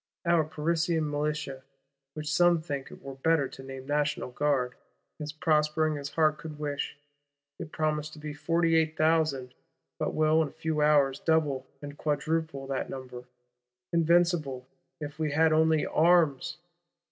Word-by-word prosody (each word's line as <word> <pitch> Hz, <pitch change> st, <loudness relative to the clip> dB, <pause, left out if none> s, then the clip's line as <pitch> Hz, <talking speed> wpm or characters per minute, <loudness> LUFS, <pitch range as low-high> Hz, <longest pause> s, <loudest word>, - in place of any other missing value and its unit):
Our 170 Hz, -2 st, +4 dB
Parisian 160 Hz, +1 st, 0 dB
Militia,—which 140 Hz, 0 st, -5 dB
some 175 Hz, 0 st, +4 dB
think 140 Hz, -4 st, -5 dB
it -, -, -13 dB
were 135 Hz, 0 st, -7 dB
better 145 Hz, +1 st, +2 dB
to -, -, -11 dB
name 135 Hz, 0 st, -8 dB
National 145 Hz, -2 st, -1 dB
Guard,—is 145 Hz, +2 st, -3 dB
prospering 155 Hz, -1 st, +1 dB
as 140 Hz, 0 st, -5 dB
heart 155 Hz, 0 st, +2 dB
could 155 Hz, -2 st, -8 dB
wish. 145 Hz, -2 st, -3 dB, 0.6 s
It 165 Hz, -3 st, -7 dB
promised 155 Hz, -1 st, -1 dB
to -, -, -11 dB
be 150 Hz, 0 st, -6 dB
forty 165 Hz, +3 st, +1 dB
eight 160 Hz, -1 st, +2 dB
thousand; 155 Hz, -5 st, +1 dB, 0.5 s
but -, -, -2 dB
will 155 Hz, +1 st, +4 dB
in 155 Hz, -, -1 dB
few 160 Hz, 0 st, -2 dB
hours 145 Hz, -3 st, +4 dB
double 145 Hz, -5 st, +1 dB, 0.2 s
and 145 Hz, 0 st, -8 dB
quadruple 155 Hz, -1 st, -1 dB
that 135 Hz, -1 st, -3 dB
number: 125 Hz, -2 st, -8 dB, 0.7 s
invincible, 170 Hz, -6 st, +2 dB, 0.3 s
if 150 Hz, 0 st, -7 dB
we 155 Hz, -2 st, -1 dB
had 160 Hz, +1 st, +4 dB
only 160 Hz, -1 st, +3 dB
arms! 165 Hz, -2 st, +3 dB
150 Hz, 140 wpm, -28 LUFS, 140-160 Hz, 0.7 s, Our